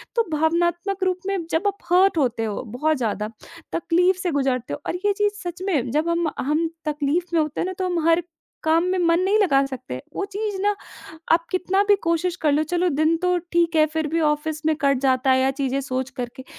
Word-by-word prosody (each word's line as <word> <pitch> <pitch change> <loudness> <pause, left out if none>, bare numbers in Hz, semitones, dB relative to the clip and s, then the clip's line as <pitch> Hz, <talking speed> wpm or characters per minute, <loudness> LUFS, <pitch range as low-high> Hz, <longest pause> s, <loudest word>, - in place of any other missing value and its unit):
तो 465 - +3
भावनात्मक 345 +5 0
रूप 370 -1 +1
में 395 0 0
जब 335 +6 +1
आप 400 0 -1
हर्ट 370 0 +5
होते 245 -6 +1
हो 215 +1 -3
बहुत 300 +8 0
ज़्यादा, 215 -3 -2 0.4
तकलीफ़ 355 +2 +2
से 365 -2 -1
गुज़रते 265 -4 -1
हो - - -4
और - - -1
ये 410 - +4
चीज़ 415 -1 +2
सच 350 0 -6
में 280 -11 0
जब 305 +5 +1
हम 335 0 +1
हम 305 +5 +1 0.2
तकलीफ़ 300 +3 0
में 325 - +4
होते 305 -2 -2
हैं - - 0
ना, 375 - -3
तो 370 0 -3
हम 345 -3 0
हर 335 +1 +4 0.4
काम 325 +1 +3
में 375 - +1
मन 335 -1 +3
नहीं 390 +3 +3
लगा 275 -9 +3
सकते। 245 - -6
वो - - -1
चीज़ 410 +1 -4
ना 410 - +3 0.6
आप 335 0 +3
कितना 370 +1 +1
भी 410 - +7
कोशिश 335 +1 0
कर 305 -5 +1
लो 295 +2 +3
चलो 350 +3 0
दिन 310 +1 +2
तो 360 +1 +1 0.2
ठीक 340 -1 +2
है 310 - +6
फिर 320 -1 -1
भी 330 +2 0
ऑफ़िस 300 0 0
में 315 - +3
कट 275 -2 +3
जाता 260 0 +2
है 260 0 +4
या 265 +1 +3
चीज़ें 270 0 -1
सोच 260 -1 -3
कर 250 -2 -4
के, 260 - -9
320 Hz, 230 wpm, -23 LUFS, 275-360 Hz, 0.6 s, भी